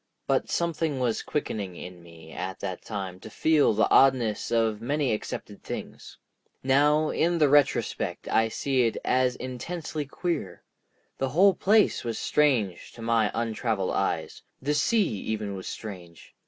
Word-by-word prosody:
But - - 0
something 165 -4 -1
was 120 -3 0
quickening 105 -10 -3
in 90 0 -9
me 85 -1 -14
at 95 +4 -5
that 95 -2 -5
time 95 -4 -5
to 110 - -10
feel 155 +5 +3
the 110 0 +2
oddness 125 -6 +4
of 115 -2 +1
many 140 0 0
accepted 105 -1 -6
things. - - -8 0.5
Now 150 +3 +3
in 170 +1 +1
the 150 -3 +4
retrospect 145 -1 +1
I 115 0 +2
see 130 +1 +1
it 115 - -3
as 125 -1 +2
intensely 150 +4 -5
queer. 140 - -4 0.6
The 135 - 0
whole 190 +8 +5
place 210 +4 +3
was 115 -1 -3
strange 120 -12 +1
to 115 - -10
my 115 -2 +2
untraveled 115 -3 -1
eyes; - - -2 0.2
the 145 +3 -1
sea 205 +9 +2
even 105 0 -3
was 95 - -7
strange. 90 -6 -9
120 Hz, 150 wpm, -27 LUFS, 105-150 Hz, 0.6 s, whole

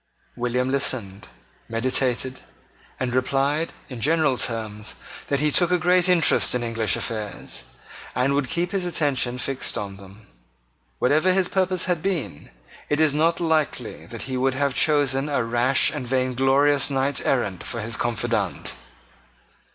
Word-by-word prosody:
William 125 +2 -1
listened, 115 -8 -1 0.4
meditated, 130 +2 0 0.6
and 125 -1 -2
replied, 140 +5 0 0.2
in 125 -4 -8
general 155 -2 +2
terms, 110 -3 -3 0.3
that 140 - 0
he 150 0 +2
took 175 +3 +3
a 180 - +3
great 180 +2 +3
interest 170 -7 +4
in 125 - -1
English 115 -4 +1
affairs, 105 -3 -3 0.5
and 130 +2 +2
would 140 -2 0
keep 175 +1 -1
his 195 -2 -1
attention 140 -7 0
fixed 130 -1 -1
on 100 -3 -5
them. 100 +2 -15 0.7
Whatever 155 +8 +3
his 185 -1 +2
purpose 185 -1 0
had 180 -3 0
been, 160 - -3 0.4
it 150 - +1
is 155 -2 +3
not 165 +3 +2
likely 160 -3 -1
that - - -7
he 130 -1 -3
would 130 +1 +1
have 140 0 0
chosen 145 -1 +2
a 140 -4 +1
rash 120 +3 +2
and 145 -5 -5
vainglorious 135 +3 +2
knight 135 0 0
errant 100 -9 0
for 120 - -3
his 115 +2 -2
confidant. 120 -2 -1
135 Hz, 145 wpm, -23 LUFS, 120-155 Hz, 0.7 s, interest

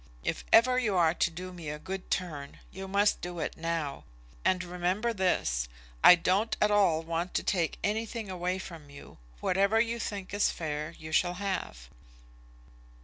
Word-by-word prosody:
If - - -2
ever 250 +3 +6
you 215 -6 0
are 165 -2 +4
to - - +1
do 180 +2 -8
me 170 -4 -7
a 150 - -4
good 190 +4 -6
turn, 150 -6 -3
you 190 0 -7
must 200 +2 +2
do 175 0 -5
it 160 - -3
now. 165 -4 -3 0.4
And 185 -1 +2
remember 180 +6 -1
this, - - +1 0.4
I 180 - +11
don't 195 +6 +1
at 210 - +3
all 185 -6 +3
want 170 +2 -3
to - - +1
take 170 -5 0
anything 220 +1 -2
away 180 0 -2
from 165 -6 -9
you. 140 - -13 0.2
Whatever 200 +4 +3
you 235 +1 0
think 200 -4 -5
is 205 - +3
fair 155 0 -4
you 155 0 -9
shall 175 +3 +2
have." 185 - -4
180 Hz, 170 wpm, -30 LUFS, 165-200 Hz, 0.4 s, I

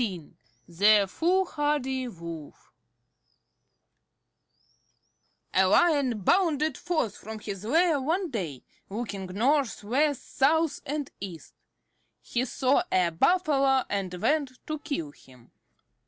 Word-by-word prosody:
XV 185 -9 -4 0.3
THE 200 +4 +4
FOOLHARDY 295 - 0
WOLF 170 -7 -9 2.8
A 190 +1 +4
lion 275 - +3
bounded 315 - +2
forth 315 - -2
from 220 +1 -8
his 205 -2 -7
lair 315 +5 +2
one 335 +5 -1
day, 165 - -4 0.3
looking 200 -2 -5
north, 245 +7 0
west, 280 +6 -1
south, 320 +3 +2
and 290 0 -3
east. 180 -5 -8 0.7
He 245 +1 -2
saw 260 +2 +2
a 180 -2 +2
Buffalo 275 - +3
and 195 -3 -2
went 280 - 0
to 310 -1 -4
kill 280 - -4
him. 125 -4 -20
255 Hz, 105 wpm, -27 LUFS, 195-300 Hz, 2.8 s, THE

